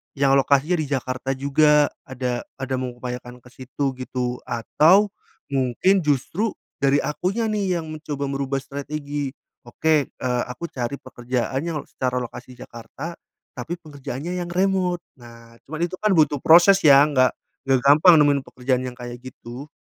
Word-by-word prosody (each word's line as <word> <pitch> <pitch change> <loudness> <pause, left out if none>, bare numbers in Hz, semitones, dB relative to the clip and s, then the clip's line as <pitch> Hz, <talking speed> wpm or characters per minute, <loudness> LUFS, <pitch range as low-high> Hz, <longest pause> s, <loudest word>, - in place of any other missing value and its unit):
yang 135 -1 +3
lokasinya 140 +5 +2
di 155 - -2
Jakarta 130 0 -2
juga. 150 +2 +4 0.2
Ada 125 -2 -3 0.2
ada 135 0 -2
mengupayakan 125 0 -6
ke 125 - -16
situ 135 +2 -3
gitu, 125 -1 -3
atau 175 - +3 0.4
mungkin 135 +9 +2
justru 160 - 0 0.3
dari 140 +1 +3
akunya 195 +9 -1
nih 195 -4 0
yang 160 - -7
mencoba 150 -2 -5
merubah 135 0 -2
strategi. 145 0 -5 0.3
Oke, 155 -3 +1
eee, 125 -1 -2
aku 150 +7 -6
cari 125 +2 -3
pekerjaan 130 +1 -3
yang 165 -3 -2
secara 125 -1 -2
lokasi 125 +1 -8
Jakarta, 135 +9 -9 0.4
tapi 150 +8 -4
pekerjaannya 150 +3 -6
yang 175 - -8
remote. 180 -1 +1 0.2
Nah, 115 -1 -15
cuman 155 +3 -6
itu 180 - -9
kan 215 - +2
butuh 150 -3 +3
proses 175 +4 +7
ya, 140 -1 +8
nggak 130 -3 +3 0.4
nggak 135 -1 +4
gampang 155 +5 +7
nemuin 145 -1 +4
pekerjaan 125 0 -1
yang 125 0 -7
kayak 120 0 -8
gitu. 130 +2 -10
140 Hz, 150 wpm, -23 LUFS, 125-160 Hz, 0.4 s, ya